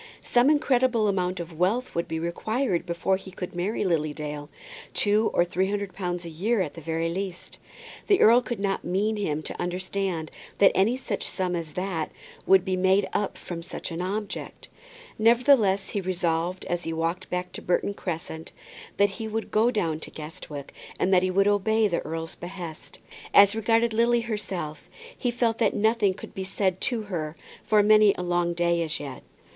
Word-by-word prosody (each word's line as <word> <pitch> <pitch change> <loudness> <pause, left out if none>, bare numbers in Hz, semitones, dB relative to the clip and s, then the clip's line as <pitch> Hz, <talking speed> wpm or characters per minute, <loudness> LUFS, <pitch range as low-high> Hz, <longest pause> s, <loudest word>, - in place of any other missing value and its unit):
Some 245 +3 +4
incredible 255 -6 +3
amount 185 -2 0
of 165 -1 -7
wealth 220 +8 +1
would 170 - -1
be 160 - -3
required 185 +5 -1
before 170 +3 +1
he 190 0 -11
could 180 -1 -7
marry 185 +4 -1
Lily 155 -4 +1
Dale. 150 -1 -5 0.5
Two 210 +1 +3
or 175 - +3
three 185 +2 0
hundred 200 -2 -3
pounds 175 -2 -3
a - - -5
year 200 +8 0
at 170 -6 -1
the 165 - -9
very 165 +1 -1
least! 185 +1 -5 0.5
The 400 -2 +4
earl 235 +3 +7
could 240 -2 -4
not 195 -1 -1
mean 200 +5 0
him 155 -7 -2
to - - -6
understand 180 -2 -2 0.3
that 200 - +6
any 220 +7 +2
such 225 -6 -3
sum 180 -2 -2
as 165 -3 -5
that 180 -4 -2 0.4
would 190 -1 +6
be 190 -1 0
made 190 +1 +3
up 205 - -1
with 170 -1 -5
such 170 - -6
an 165 +1 -3
object! 205 +2 -5 0.5
Nevertheless 225 -4 +4
he 200 - -2
resolved 180 -1 -1
as 175 0 -2
he 165 - -3
walked 165 +3 -2
home 180 0 0
to - - -6
Burton 180 +3 0
Crescent 165 -4 -5 0.5
that 200 0 +4
he 220 - -3
would 220 +1 -4
go 220 +3 +4
down 170 -10 -1
to - - -9
Guestwick, 150 -2 -8 0.3
and 190 - +2
that 180 - +6
he 185 - +1
would 195 +2 +3
obey 215 +2 +3
the 175 -4 0
earl's 165 0 -5
behest. 175 -3 -8 0.4
As 200 +1 +8
regarded 225 +1 +2
Lily 235 +1 +3
herself 195 -9 -4 0.3
he 245 - -1
felt 235 -2 0
that - - +2
nothing 215 -2 +2
could - - -10
be 190 - -4
said 190 -1 -1
to 235 -4 -2
her 165 -6 -4 0.3
for 210 -1 +4
many 215 -1 +6
a 180 - -3
long 175 -1 0
day 170 0 +2
as 160 -1 -2
yet. 140 -3 -7
190 Hz, 185 wpm, -26 LUFS, 170-215 Hz, 0.5 s, As